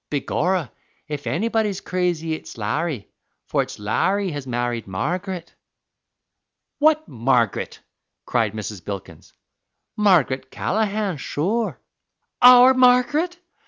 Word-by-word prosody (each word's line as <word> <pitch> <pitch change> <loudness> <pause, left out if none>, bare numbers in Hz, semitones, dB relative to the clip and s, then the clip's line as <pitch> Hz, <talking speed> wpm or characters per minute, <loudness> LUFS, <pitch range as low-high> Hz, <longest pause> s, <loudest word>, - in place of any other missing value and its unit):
"Begorra, 160 +3 -1 0.4
if 145 -1 -5
anybody's 215 +1 0
crazy, 175 -4 -1
it's 155 - -8
Larry, 125 +3 -2 0.4
for - - +1
it's - - -6
Larry 190 - 0
has 145 -3 -6
married 120 -2 -2
Margaret." 175 - -4 1.3
"What 310 +1 +3
Margaret?" 120 -2 0 0.4
cried 115 -4 0
Mrs. 105 -4 -6
Bilkins. 100 -1 -8 0.6
"Margaret 150 -11 +2
Callaghan, 210 -2 -1
sure." 205 +12 -2 0.6
"Our 250 +1 +9
Margaret? 255 +7 +3
170 Hz, 95 wpm, -22 LUFS, -, 1.3 s, Our